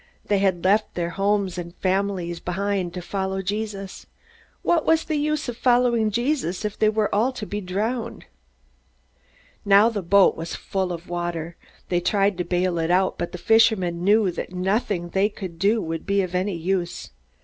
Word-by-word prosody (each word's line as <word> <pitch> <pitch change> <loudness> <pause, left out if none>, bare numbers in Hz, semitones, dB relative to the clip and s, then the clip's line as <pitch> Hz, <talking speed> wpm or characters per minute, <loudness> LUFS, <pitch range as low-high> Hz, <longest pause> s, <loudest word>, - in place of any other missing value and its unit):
They 205 -1 +1
had 190 -3 +1
left 205 +3 +2
their 170 -1 -2
homes 195 -1 0
and 170 0 -7
families 185 -3 -1
behind, 190 0 -2
to 180 - -5
follow 190 0 -3
Jesus. 200 0 -4 0.6
What 335 -3 +2
was 325 0 +3
the 315 - -2
use 300 0 -1
of 240 -2 -5
following 240 -3 +3
Jesus 240 - -1
if 210 0 -3
they 215 - +3
were 215 -1 0
all 225 +6 +2
to 220 - -6
be 205 0 -4
drowned? 220 +5 -3 1.4
Now 200 +3 +6
the 215 -3 -3
boat 195 +2 +4
was 165 +1 -5
full 190 -2 -2
of 170 0 -6
water. 170 -1 -4 0.3
They 175 - +2
tried 195 +1 +1
to - - +1
bail 180 -1 0
it 165 0 -1
out, 185 +2 +2
but 175 - -3
the 180 - -6
fishermen 185 -3 +3
knew 205 0 +4
that 175 - -6
nothing 185 -1 -1
they 195 +3 +2
could 185 -5 -8
do 210 +4 +3
would 165 0 -5
be 200 0 +2
of 180 -1 -5
any 185 +1 0
use. 175 - -2
195 Hz, 180 wpm, -23 LUFS, 175-215 Hz, 1.4 s, Now